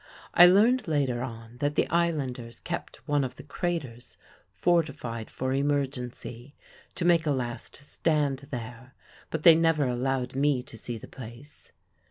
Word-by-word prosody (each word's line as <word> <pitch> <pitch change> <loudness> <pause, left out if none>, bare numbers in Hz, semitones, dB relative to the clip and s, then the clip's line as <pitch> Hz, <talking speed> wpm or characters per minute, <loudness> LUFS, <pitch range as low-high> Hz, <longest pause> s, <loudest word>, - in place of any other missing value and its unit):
(I 175 - +9
learned 220 +7 +4
later 135 -6 0
on 115 -2 -7
that 145 +1 0
the - - +2
islanders 140 -9 -1
kept - - -6
one 145 -1 +2
of 130 - -4
the - - -11
craters 140 -6 -4 0.3
fortified 140 -10 0
for 130 0 -2
emergency, 135 -2 -2 0.4
to 175 - -2
make 170 -2 +4
a - - +3
last 120 -3 -4
stand 145 -2 -1
there; 125 0 -7 0.3
but 160 -1 -3
they 170 - +10
never 165 -2 +3
allowed 125 +1 -1
me 135 -1 +1
to 120 - -13
see 115 +1 -5
the - - -11
place.) 125 +4 -12
135 Hz, 150 wpm, -28 LUFS, 125-155 Hz, 0.4 s, they